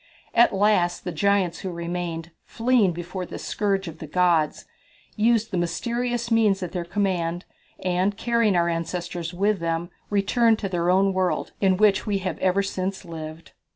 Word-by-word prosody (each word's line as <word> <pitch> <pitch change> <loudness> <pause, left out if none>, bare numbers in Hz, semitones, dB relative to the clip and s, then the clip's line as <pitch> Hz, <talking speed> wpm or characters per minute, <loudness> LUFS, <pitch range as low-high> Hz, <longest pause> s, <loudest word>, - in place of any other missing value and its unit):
At 235 - +5
last 195 -3 +2
the 180 - -3
giants 185 0 +1
who 190 - -4
remained, 170 -1 -4
fleeing 230 -5 +2
before 175 +2 -5
this - - -7
scourge 195 -2 -1
of 160 -1 -8
the 155 - -7
gods, 170 -2 +1 0.5
used 225 +1 +2
the 185 - 0
mysterious 235 +7 -2
means 210 -4 +3
at 180 - -4
their 175 -2 -3
command, 175 -2 -1 0.4
and, 185 +3 +1
carrying 235 -4 +2
our 170 -1 +3
ancestors 170 0 -3
with 200 +2 +1
them, 165 +1 -2 0.2
returned 220 +3 +3
to 200 -3 -3
their 175 -1 0
own 195 +1 +3
world, 185 -1 0
in 190 -2 +3
which 210 0 +3
we 205 -1 +1
have 185 -4 -4
ever 190 +1 +2
since 190 0 -3
lived." 160 -1 -8
185 Hz, 165 wpm, -24 LUFS, 170-205 Hz, 0.5 s, At